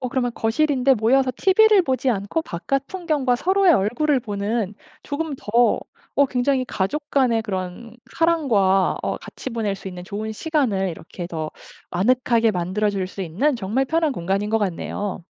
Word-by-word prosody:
어 255 - -2
그러면 245 -1 -1
거실인데 270 +2 +2
모여서 255 +4 +3
TV를 415 +1 +5
보지 260 -3 0
않고 205 +8 -1
바깥 275 - -2
풍경과 305 -9 0
서로의 380 +4 +3
얼굴을 270 +7 +2
보는 210 -1 -2 0.3
조금 300 +1 -3
더 235 +3 +2 0.3
어 280 - +4
굉장히 255 0 0
가족 290 +11 -2
간의 250 -5 +3
그런 205 +2 -5 0.2
사랑과 225 - +3
어 - - -1
같이 - - -8
보낼 220 -4 -2
수 195 - -8
있는 180 -1 -8
좋은 210 +3 -5
시간을 220 - 0
이렇게 170 +1 -8
더 160 -3 -4 0.4
아늑하게 235 +4 +2
만들어 190 +3 0
줄 195 -2 -2
수 195 +1 -6
있는 215 - 0
정말 235 +5 -1
편한 320 -2 +1
공간인 195 +2 -1
것 225 - +3
같네요. 195 -1 -3
235 Hz, 335 characters per minute, -22 LUFS, 195-275 Hz, 0.4 s, TV를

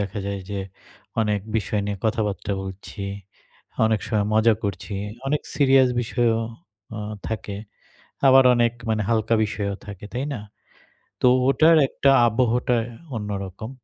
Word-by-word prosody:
দেখা 100 0 -3
যায় 100 -1 -3
যে 100 -1 -2 0.6
অনেক 105 -2 +1 0.2
বিষয় 105 -1 -1
নিয়ে 100 0 -2
কথাবার্তা 105 -3 -1
বলছি। 95 +2 -8 0.8
অনেক 110 -2 +1
সময় 105 -3 0
মজা 110 +1 +5
করছি। 100 +1 -4 0.3
অনেক 150 +2 0
সিরিয়াস 135 -2 +5
বিষয়ও 115 -1 +1 0.6
আ - - -4 0.3
থাকে। 105 -2 -4 0.7
আবার 135 0 +7
অনেক 120 -1 +2 0.2
মানে 110 -1 +1
হালকা 115 0 +2
বিষয়ও 100 -2 -3
থাকে, 105 -1 -9
তাই 125 +2 -2
না? 115 - -5 0.8
তো - - +3 0.2
ওটার 160 +4 +5
একটা 140 - +2 0.2
আবহাওয়াটা 120 +1 +2 0.4
অন্যরকম। 100 0 -5
110 Hz, 130 wpm, -23 LUFS, 100-120 Hz, 0.8 s, আবার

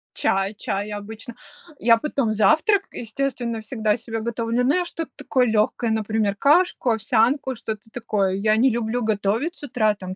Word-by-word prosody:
Чай 195 +1 0
чай 205 +1 -3
обычно. 215 +3 -7 0.5
Я 230 0 +5
потом 270 -4 -1
завтрак, 315 - +3
естественно, 235 -1 -3
всегда 215 -1 0
себе 225 0 -5
готовлю, 235 +1 -1
но 270 +4 +3
я 360 -1 +1
что-то 330 -2 -5
такое 260 -3 +1
легкое, 220 +2 +1
например, 215 -2 0
кашку, 295 - +3
овсянку, 240 +5 +1
что-то 220 -1 -6
такое. 210 -5 -1
Я 215 +2 +2
не 255 +4 +4
люблю 235 0 -1
готовить 220 - 0
с - - -12
утра, 220 -6 +1
там, 185 -2 -7
225 Hz, 160 wpm, -23 LUFS, 215-260 Hz, 0.5 s, Я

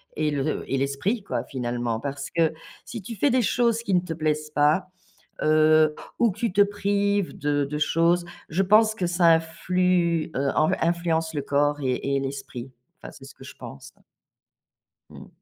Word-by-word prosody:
et 155 -1 0
le 145 +1 -2
et 135 - +1
l'esprit 140 - -1
quoi, - - -3
finalement, 120 -3 -3
parce 140 +1 -5
que 165 -2 +1 0.3
si 230 - -7
tu 220 +3 -8
fais 285 - +2
des 255 -1 +2
choses 235 0 +1
qui 200 - -2
ne 180 - +5
te 170 -2 -5
plaisent 155 -1 -2
pas, 150 +5 +2 0.6
heu, 155 0 +4 0.2
ou 235 - +3
que 200 - -10
tu 230 -5 -1
te 205 - +5
prives 200 -1 0
de 145 -1 0
de 150 +1 -4
choses, 170 +3 +2 0.2
je 175 +5 0
pense 215 +3 +4
que 185 -5 -2
ça 175 0 +2
influe 170 0 0
heu, 140 +1 0 0.3
influence 165 -1 0
le 145 - -2
corps 145 +1 +1
et 135 +1 -1
et - - 0
l'esprit, 135 -2 -6 0.3
enfin - - -9
c'est - - -14
ce - - -14
que - - -14
je - - -11
pense, 70 - -11
hein. - - -29 1.1
Mmh. - - -12
160 Hz, 185 wpm, -24 LUFS, 145-190 Hz, 1.1 s, ne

